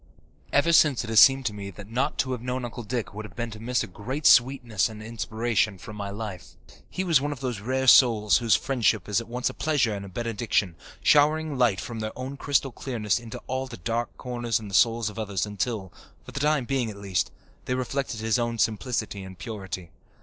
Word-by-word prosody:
Ever 165 +4 +3
since 150 -6 +5
it 115 - -6
has 110 - +6
seemed 135 -1 +7
to 105 - 0
me 100 -1 -6
that 100 +1 -11
not 125 +6 -1
to 130 - 0
have 125 -3 -3
known 125 0 -3
Uncle 120 +1 -6
Dick 115 -1 -4
would 105 +1 -6
have 105 -4 -11
been 120 -1 -4
to 110 - -9
miss 125 +2 0
a - - -3
great 130 - -6
sweetness 120 -5 +4
and 110 -1 -9
inspiration 115 -2 -1
from 105 +3 -10
my 100 -1 -4
life. 100 -5 -7 0.3
He 185 - -3
was 165 -7 +4
one 145 +1 -2
of 145 - -6
those 125 -5 -3
rare 130 +5 -1
souls 115 -5 +6
whose 115 -3 +4
friendship 115 -7 +1
is 105 +2 +1
at 115 - -11
once 125 +1 -2
a - - -14
pleasure 145 -8 +1
and 100 -1 -5
a 100 - -8
benediction, 105 -3 -1 0.3
showering 150 +1 +4
light 120 -6 +2
from 115 -2 -6
their 110 +1 -5
own 130 +2 -5
crystal 140 -1 0
clearness 115 -4 -1
into 115 -2 -8
all 130 +1 -3
the 125 - -9
dark 115 +6 -3
corners 120 -2 -2
in 105 -2 -8
the - - -11
souls 115 +2 +3
of 105 +1 -6
others 100 -4 -1
until, 105 -2 -3 0.3
for - - -10
the - - -4
time 150 -2 +2
being 130 -3 0
at 105 - -8
least, 100 -3 -1 0.4
they 125 - -1
reflected 130 -2 -3
his 110 +2 +1
own 120 0 -1
simplicity 110 -2 -1
and 95 -1 -10
purity. 95 -6 -6
115 Hz, 225 wpm, -26 LUFS, 105-130 Hz, 0.4 s, seemed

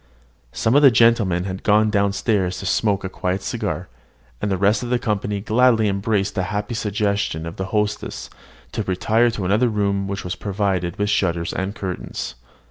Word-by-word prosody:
Some 110 - 0
of 145 - +6
the 140 - +9
gentlemen 115 -7 +3
had 95 0 -5
gone 105 +1 +3
down 100 -1 +2
stairs 100 -3 0
to - - -6
smoke 105 -3 +1
a - - -2
quiet 95 0 -3
cigar, - - -3 0.5
and 105 - -1
the 95 - 0
rest 100 +3 +2
of 120 - -4
the 125 - +2
company 105 -3 -2
gladly 115 0 +3
embraced 100 0 0
a 95 - -1
happy 105 +4 -3
suggestion 100 -6 -1
of 85 - -7
the 95 - -2
hostess 105 +1 -2 0.4
to - - -2
retire 105 +4 +1
into 110 -5 -1
another 110 +6 +3
room 100 -2 0
which 100 0 -4
was 90 - -3
provided 95 -4 -2
with 105 0 0
shutters 85 -4 0
and 95 +3 -3
curtains. 95 - -5
100 Hz, 185 wpm, -21 LUFS, 95-110 Hz, 0.5 s, the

